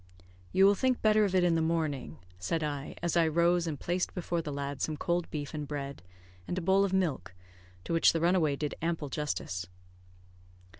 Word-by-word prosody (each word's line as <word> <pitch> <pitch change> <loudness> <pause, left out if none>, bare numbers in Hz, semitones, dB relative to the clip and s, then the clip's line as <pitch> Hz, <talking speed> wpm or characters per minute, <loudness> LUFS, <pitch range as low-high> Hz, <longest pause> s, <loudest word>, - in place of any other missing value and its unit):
"You 190 +1 +5
will 200 - +7
think 255 +5 +1
better 215 -1 +5
of 190 -2 -1
it 185 - +4
in 175 -1 +3
the 165 - +2
morning," 160 -4 -1 0.2
said 155 - -1
I, 145 -2 -4
as 175 -1 0
I 170 -1 +4
rose 170 +2 +2
and 150 -4 -3
placed 175 +1 -2
before 175 -2 -1
the 155 -2 -5
lad 140 0 -4
some 155 -1 -1
cold 175 +2 -1
beef 145 -1 -5
and 150 -2 -4
bread, 140 -1 -5 0.5
and 175 - -3
a - - +2
bowl 190 +3 +4
of 200 - 0
milk, 175 - -1 0.5
to - - -3
which 165 - +5
the 165 - -1
runaway 170 -4 +2
did 150 +1 -3
ample 165 -3 -2
justice. 90 - -3
165 Hz, 200 wpm, -30 LUFS, 145-175 Hz, 0.5 s, will